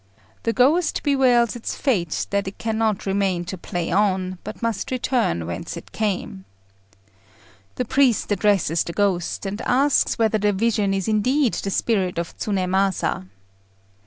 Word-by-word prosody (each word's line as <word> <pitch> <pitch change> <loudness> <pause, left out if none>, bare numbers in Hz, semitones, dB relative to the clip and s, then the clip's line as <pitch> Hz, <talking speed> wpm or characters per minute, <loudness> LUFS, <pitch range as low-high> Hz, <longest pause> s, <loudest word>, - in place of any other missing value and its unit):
The 230 - 0
ghost 295 +8 +2
bewails 255 -5 +3
its 235 - -4
fate 190 - 0
that 200 -1 0
it 195 - -6
cannot 220 -2 -1
remain 195 -3 0
to 185 - -5
play 175 -1 -4
on, 185 -1 +1
but - - -8
must 230 -3 -1
return 245 - 0
whence 85 0 -5
it - - -11
came. 195 - -3 1.3
The 250 - -2
priest 260 -3 +2
addresses 200 -6 +2
the 170 - -6
ghost, 195 -2 0
and 200 +3 -4
asks 275 +3 +2
whether 220 -1 +2
the 205 0 +2
vision 210 -1 +1
is 195 -2 -2
indeed 245 +5 +2
the 195 - -3
spirit 195 -3 0
of 170 -1 -4
Tsunémasa. 190 - 0
205 Hz, 145 wpm, -22 LUFS, 185-235 Hz, 1.3 s, bewails